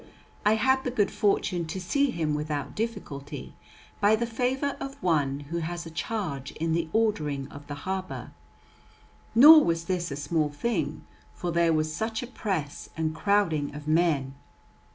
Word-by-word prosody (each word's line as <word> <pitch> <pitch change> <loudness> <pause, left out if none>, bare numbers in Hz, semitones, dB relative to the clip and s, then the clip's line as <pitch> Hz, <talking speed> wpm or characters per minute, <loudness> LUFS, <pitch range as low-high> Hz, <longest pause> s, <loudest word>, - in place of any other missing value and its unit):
I 210 +1 +4
had 260 +4 +2
the - - -1
good 220 -5 +1
fortune 185 -4 +1
to 190 - -4
see 280 +10 +1
him 160 -9 -1
without 150 -1 -3
difficulty, 175 -11 -5 0.5
by 205 +1 +5
the 235 +2 -1
favour 255 +4 -1
of 275 0 -5
one 145 -5 +1
who 170 - -1
has 170 +1 -4
a 165 - -8
charge 165 - -3
in 160 +1 -1
the 165 -1 0
ordering 155 -12 0
of 145 0 -11
the 145 - -5
harbour. 190 0 -4 1.0
Nor 305 +6 +10
was 165 0 0
this 175 -1 -1
a 140 - -4
small 150 +2 0
thing, 230 +11 -2 0.3
for 175 - -3
there 170 0 +3
was 155 0 0
such 220 +4 -2
a - - -6
press 190 - -4
and 160 -1 0
crowding 160 -5 +1
of 150 0 -8
men. 155 -5 +2
170 Hz, 165 wpm, -27 LUFS, 150-220 Hz, 1.0 s, Nor